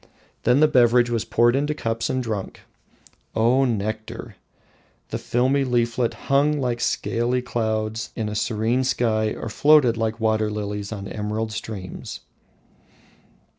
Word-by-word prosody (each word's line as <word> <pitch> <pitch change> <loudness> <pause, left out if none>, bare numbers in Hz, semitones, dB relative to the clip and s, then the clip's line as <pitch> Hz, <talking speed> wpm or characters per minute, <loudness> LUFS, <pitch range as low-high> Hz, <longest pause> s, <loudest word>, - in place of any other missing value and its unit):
Then 125 +4 +4
the 155 - +7
beverage 120 -3 +4
was 115 -2 -1
poured 120 +1 +3
into 145 +2 0
cups 115 -4 -2
and 130 0 -1
drunk. 110 -5 -5 0.7
O 125 +4 +3
nectar! 110 -2 -3 0.7
The - - -3
filmy 130 +3 +1
leaflet 120 -1 0
hung 145 +2 +2
like 120 -3 -1
scaly 120 +2 0
clouds 110 -2 -2
in 110 -2 -2
a 105 - -4
serene 110 +4 0
sky 110 -4 0
or - - -6
floated 130 0 +4
like 110 0 -1
waterlilies 105 -2 -1
on 100 -2 -5
emerald 110 +1 -3
streams. 105 -5 -7
115 Hz, 130 wpm, -23 LUFS, 110-125 Hz, 0.7 s, the